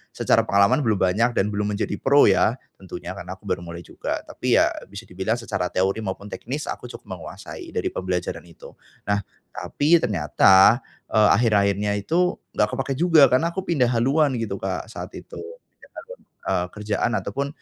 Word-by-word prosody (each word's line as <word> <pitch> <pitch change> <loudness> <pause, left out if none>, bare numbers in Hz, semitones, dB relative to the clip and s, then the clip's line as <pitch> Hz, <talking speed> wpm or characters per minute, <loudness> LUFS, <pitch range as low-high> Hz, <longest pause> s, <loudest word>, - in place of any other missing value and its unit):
secara - - +2
pengalaman 100 +7 +4
belum 115 -6 +1 0.2
banyak 115 +5 +1
dan 105 +2 +1
belum 105 0 -2
menjadi 105 - -3
pro 140 +2 +5
ya 115 - +2 0.2
tentunya 90 -1 -8
karena 95 -1 -7
aku 95 - -29
baru 95 - -2
mulai 85 0 -9
juga - - -5
tapi - - -1
ya - - +4 0.2
bisa 100 +3 -9
dibilang 95 +3 -2
secara 115 -6 -3
teori 95 +3 0
maupun 100 0 -6
teknis 140 +6 -5
aku 125 - -7
cukup - - -11 0.2
menguasai - - -9
dari - - -1
pembelajaran 90 -2 -3
itu. 85 - -14 0.3
Nah 100 0 0 0.4
tapi 160 +4 +2
ternyata, 95 - +4 0.3
eee, 110 -2 +5
akhir-akhirnya 105 -3 +2
itu 175 - +1 0.2
nggak 105 - +3
kepakai 135 0 -2
juga 160 -3 +6
karena 165 +7 +2
aku 190 +1 -4
pindah 140 -8 +2
haluan 135 +5 +2
gitu 105 -4 -3
Kak 95 -1 -3
saat - - -7
itu - - -10
3 470 +3 -13
tahun, - - -10 0.3
eee, 90 - +1
kerjaan 105 +2 -1
ataupun 140 +9 -3
105 Hz, 175 wpm, -23 LUFS, 95-135 Hz, 0.4 s, juga